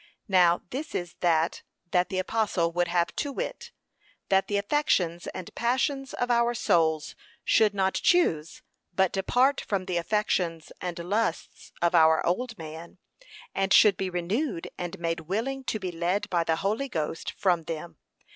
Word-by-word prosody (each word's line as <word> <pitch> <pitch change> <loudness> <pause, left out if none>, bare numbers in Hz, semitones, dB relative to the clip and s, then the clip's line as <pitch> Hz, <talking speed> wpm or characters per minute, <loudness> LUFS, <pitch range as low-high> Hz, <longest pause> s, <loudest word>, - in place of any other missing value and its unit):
Now 180 -3 +4
this 290 +4 -5
is 175 -1 -3
that 165 -1 +1 0.3
that 180 +1 +2
the 190 - -3
apostle 185 -3 0
would 175 +1 0
have, 175 0 0
to 285 - -1
wit, - - -5 0.6
that 195 0 +3
the 205 - 0
affections 200 - +1
and 185 -2 -7
passions 270 +3 -1
of 245 0 -1
our 235 0 +2
souls 160 -8 +1 0.3
should 215 -2 +4
not 190 -1 +1
choose 165 - +1 0.3
but 190 -1 +3
depart 250 +8 +2
from 195 -3 -2
the 180 -2 -1
affections 170 -4 -1
and 180 -2 -4
lusts 180 +2 -2
of 170 +1 +3
our 160 -1 +5
old 225 +6 -1
man, 160 +2 -9 0.6
and 195 0 0
should 210 -1 +7
be 190 0 -2
renewed 180 - -2
and 175 -1 -5
made 165 0 -2
willing 225 - -3
to 220 - -1
be 185 -2 -4
led 175 +4 -1
by 170 -2 +2
the 160 - +2
Holy 215 +10 -1
Ghost 160 -4 -3
from 175 -4 +1
them. 165 +1 -6
185 Hz, 160 wpm, -27 LUFS, 170-225 Hz, 0.6 s, should